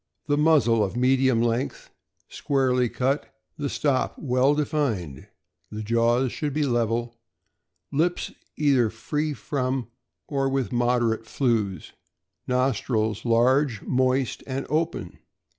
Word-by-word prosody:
The 145 Hz, -, +1 dB
muzzle 145 Hz, -8 st, +4 dB
of 100 Hz, +4 st, -3 dB
medium 130 Hz, -1 st, +3 dB
length, 120 Hz, +3 st, -2 dB, 0.4 s
squarely 130 Hz, -3 st, +1 dB
cut, 135 Hz, +5 st, -1 dB, 0.3 s
the 145 Hz, -1 st, -2 dB
stop 140 Hz, -2 st, 0 dB
well 130 Hz, +1 st, +2 dB
defined. 130 Hz, -, -2 dB, 0.4 s
The 110 Hz, 0 st, -6 dB
jaws 115 Hz, +3 st, +2 dB
should 150 Hz, -3 st, -3 dB
be 150 Hz, +1 st, +1 dB
level. 120 Hz, -2 st, -1 dB, 0.7 s
Lips 170 Hz, +5 st, 0 dB, 0.3 s
either 135 Hz, -6 st, +3 dB
free 150 Hz, +7 st, -3 dB
from 130 Hz, 0 st, -2 dB, 0.4 s
or 135 Hz, -2 st, 0 dB
with 135 Hz, -2 st, -1 dB
moderate 120 Hz, -2 st, +1 dB
flews. 110 Hz, -, -1 dB, 0.5 s
Nostrils 120 Hz, -4 st, 0 dB
large, 120 Hz, +1 st, +2 dB
moist, 130 Hz, -1 st, 0 dB
and 135 Hz, 0 st, -3 dB
open. 160 Hz, +2 st, -2 dB
125 Hz, 110 wpm, -25 LUFS, 115-140 Hz, 0.7 s, muzzle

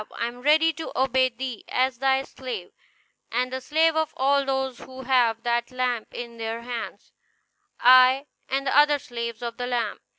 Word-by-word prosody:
I -, -, -1 dB
am 240 Hz, +1 st, -6 dB
ready 315 Hz, +4 st, +4 dB
to 320 Hz, +1 st, -7 dB
obey 260 Hz, 0 st, +3 dB
thee 250 Hz, -1 st, -6 dB
as 255 Hz, -1 st, 0 dB
thy 270 Hz, 0 st, +2 dB
slave, 245 Hz, -10 st, -7 dB, 0.6 s
and 250 Hz, +2 st, -1 dB
the 260 Hz, -, -3 dB
slave 320 Hz, +4 st, +2 dB
of 315 Hz, -1 st, -1 dB
all 280 Hz, +1 st, +2 dB
those 265 Hz, -2 st, -2 dB
who 260 Hz, 0 st, -10 dB
have 240 Hz, -3 st, +2 dB
that 240 Hz, 0 st, 0 dB
lamp 250 Hz, -3 st, -2 dB
in 235 Hz, -1 st, -8 dB
their 225 Hz, +1 st, -4 dB
hands; 240 Hz, -1 st, -7 dB, 0.7 s
I 255 Hz, +2 st, +6 dB, 0.2 s
and 275 Hz, +1 st, -1 dB
the 270 Hz, -, 0 dB
other 295 Hz, 0 st, +5 dB
slaves 235 Hz, -3 st, -6 dB
of 235 Hz, -1 st, -5 dB
the 245 Hz, -1 st, -3 dB
lamp." 235 Hz, -4 st, -2 dB
255 Hz, 175 wpm, -25 LUFS, 235-270 Hz, 0.7 s, I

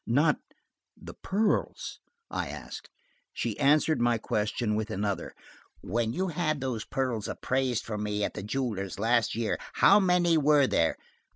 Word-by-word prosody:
"Not–the 145 Hz, +6 st, -2 dB
pearls?" 205 Hz, +2 st, -1 dB, 0.3 s
I -, -, -2 dB
asked. -, -, -8 dB, 0.4 s
She -, -, -3 dB
answered 150 Hz, +1 st, +3 dB
my 120 Hz, -1 st, +3 dB
question 105 Hz, +1 st, -1 dB
with 110 Hz, +1 st, -2 dB
another. 100 Hz, -2 st, -3 dB, 0.5 s
"When 115 Hz, +3 st, -1 dB
you 185 Hz, +9 st, -1 dB
had 155 Hz, -3 st, -1 dB
those 125 Hz, -5 st, -3 dB
pearls 125 Hz, -5 st, -2 dB
appraised 130 Hz, -2 st, -1 dB
for 105 Hz, -2 st, -4 dB
me 105 Hz, 0 st, -1 dB
at -, -, -1 dB
the -, -, -5 dB
jewelers 105 Hz, -4 st, -3 dB
last 115 Hz, +2 st, +2 dB
year, 115 Hz, -1 st, -1 dB
how 200 Hz, -, +6 dB
many 180 Hz, -4 st, +3 dB
were 145 Hz, -1 st, +5 dB
there?" 80 Hz, -10 st, +1 dB
120 Hz, 145 wpm, -28 LUFS, 105-150 Hz, 0.5 s, how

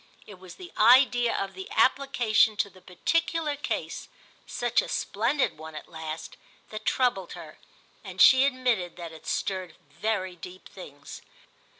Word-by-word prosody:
It 205 Hz, -3 st, -13 dB
was 185 Hz, -1 st, -12 dB
the 360 Hz, -1 st, -11 dB
idea 245 Hz, +1 st, +5 dB
of 195 Hz, 0 st, -3 dB
the 190 Hz, 0 st, -9 dB
application 235 Hz, -4 st, +2 dB
to 200 Hz, -, -1 dB
the 185 Hz, -, -18 dB
particular 325 Hz, -, -1 dB
case, 285 Hz, -, -4 dB, 0.4 s
such 240 Hz, 0 st, +1 dB
a -, -, -7 dB
splendid 235 Hz, -, -1 dB
one 160 Hz, 0 st, -9 dB
at 150 Hz, -, -8 dB
last, 160 Hz, -1 st, -7 dB, 0.3 s
that 215 Hz, 0 st, -7 dB
troubled 240 Hz, -8 st, 0 dB
her, -, -, -11 dB, 0.4 s
and -, -, -10 dB
she 260 Hz, 0 st, +8 dB
admitted 250 Hz, -10 st, 0 dB
that 170 Hz, -2 st, -8 dB
it 160 Hz, -, -13 dB
stirred 185 Hz, -4 st, -3 dB, 0.2 s
very 185 Hz, +2 st, -2 dB
deep 180 Hz, +2 st, -11 dB
things. 145 Hz, -7 st, -11 dB
205 Hz, 150 wpm, -27 LUFS, 180-255 Hz, 0.4 s, she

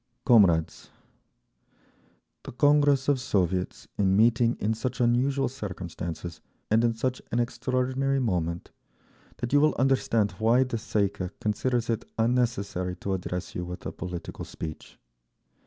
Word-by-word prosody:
"Comrades! 95 Hz, -, +4 dB, 1.5 s
The -, -, -9 dB
Congress 145 Hz, 0 st, +3 dB
of 140 Hz, -2 st, +3 dB
Soviets 95 Hz, -7 st, -1 dB
in 95 Hz, -1 st, +3 dB
meeting 115 Hz, +2 st, +3 dB
in 110 Hz, +2 st, 0 dB
such 120 Hz, +3 st, -4 dB
unusual 130 Hz, +3 st, +2 dB
circumstances 90 Hz, -7 st, -6 dB, 0.3 s
and 110 Hz, +2 st, +4 dB
in 115 Hz, -1 st, +2 dB
such 125 Hz, +2 st, -2 dB
an 120 Hz, -, +1 dB
extraordinary 130 Hz, +3 st, 0 dB
moment 85 Hz, -8 st, -2 dB, 0.7 s
that 120 Hz, +2 st, -4 dB
you 145 Hz, -, +6 dB
will 155 Hz, -1 st, +3 dB
understand 120 Hz, -5 st, +2 dB
why 115 Hz, +4 st, +4 dB
the 130 Hz, -2 st, -3 dB
Tsay 105 Hz, -1 st, 0 dB
ee -, -, -1 dB
kah 90 Hz, -2 st, -5 dB
considers 120 Hz, +3 st, 0 dB
it 115 Hz, -1 st, -1 dB
unnecessary 115 Hz, -6 st, 0 dB
to 95 Hz, +2 st, -3 dB
address 90 Hz, -1 st, -4 dB
you 90 Hz, -, -3 dB
with 90 Hz, 0 st, -7 dB
a -, -, -3 dB
political 90 Hz, -2 st, -6 dB
speech. 80 Hz, -1 st, -8 dB
115 Hz, 140 wpm, -27 LUFS, 95-130 Hz, 1.5 s, you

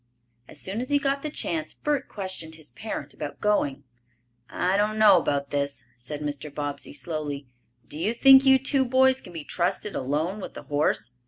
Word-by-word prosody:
As -, -, -9 dB
soon 200 Hz, +5 st, -3 dB
as 255 Hz, -, -5 dB
he 290 Hz, -, +4 dB
got 275 Hz, 0 st, 0 dB
the 305 Hz, -, -3 dB
chance 315 Hz, +1 st, -3 dB
Bert 290 Hz, -3 st, -1 dB
questioned 185 Hz, -5 st, -6 dB
his 155 Hz, -2 st, -11 dB
parent 220 Hz, -, -6 dB
about 150 Hz, -2 st, -6 dB
going. 205 Hz, -10 st, +1 dB, 0.7 s
"I 185 Hz, +8 st, 0 dB
don't 210 Hz, +1 st, +1 dB
know 205 Hz, -4 st, +7 dB
about 140 Hz, -3 st, -1 dB
this," 140 Hz, -2 st, -2 dB
said 125 Hz, +5 st, -7 dB
Mr. 145 Hz, 0 st, -4 dB
Bobbsey 145 Hz, 0 st, -4 dB
slowly. 145 Hz, -1 st, -4 dB, 0.4 s
"Do 150 Hz, -, -7 dB
you 215 Hz, +7 st, 0 dB
think 270 Hz, +2 st, +8 dB
you 265 Hz, -1 st, +7 dB
two 270 Hz, +1 st, +2 dB
boys 260 Hz, +1 st, +3 dB
can -, -, -12 dB
be 165 Hz, -3 st, -6 dB
trusted 190 Hz, +6 st, -1 dB
alone 155 Hz, +9 st, -1 dB
with -, -, -8 dB
the -, -, -8 dB
horse?" 145 Hz, -6 st, 0 dB
180 Hz, 185 wpm, -26 LUFS, -, 0.7 s, think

